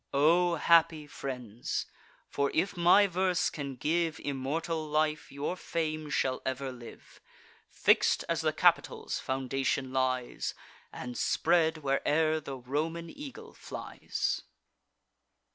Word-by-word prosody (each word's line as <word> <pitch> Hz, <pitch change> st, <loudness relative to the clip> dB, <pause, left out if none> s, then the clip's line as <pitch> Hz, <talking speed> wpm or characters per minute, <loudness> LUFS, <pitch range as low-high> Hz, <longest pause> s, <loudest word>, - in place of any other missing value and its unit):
O 170 Hz, +4 st, +4 dB
happy 165 Hz, -1 st, +4 dB
friends! 125 Hz, -6 st, -4 dB, 0.4 s
for, 140 Hz, 0 st, 0 dB
if 195 Hz, +5 st, +1 dB
my 175 Hz, +4 st, +6 dB
verse 185 Hz, -1 st, +1 dB
can 140 Hz, -3 st, -5 dB
give 160 Hz, +4 st, 0 dB
Immortal 155 Hz, +4 st, -2 dB
life, 155 Hz, 0 st, 0 dB
your 140 Hz, +5 st, -3 dB
fame 155 Hz, -3 st, -3 dB
shall 130 Hz, -3 st, 0 dB
ever 130 Hz, 0 st, -3 dB
live, 120 Hz, -2 st, -13 dB, 0.5 s
Fix'd -, -, +3 dB
as -, -, 0 dB
the -, -, +2 dB
Capitol's -, -, +2 dB
foundation 135 Hz, 0 st, -1 dB
lies, 130 Hz, -1 st, -1 dB, 0.4 s
And 125 Hz, 0 st, -7 dB
spread, 160 Hz, 0 st, +2 dB
where'er 155 Hz, +3 st, +2 dB
the 140 Hz, -3 st, -7 dB
Roman 160 Hz, +6 st, -3 dB
eagle 280 Hz, -2 st, -9 dB
flies! -, -, -3 dB
150 Hz, 110 wpm, -30 LUFS, 135-165 Hz, 0.5 s, my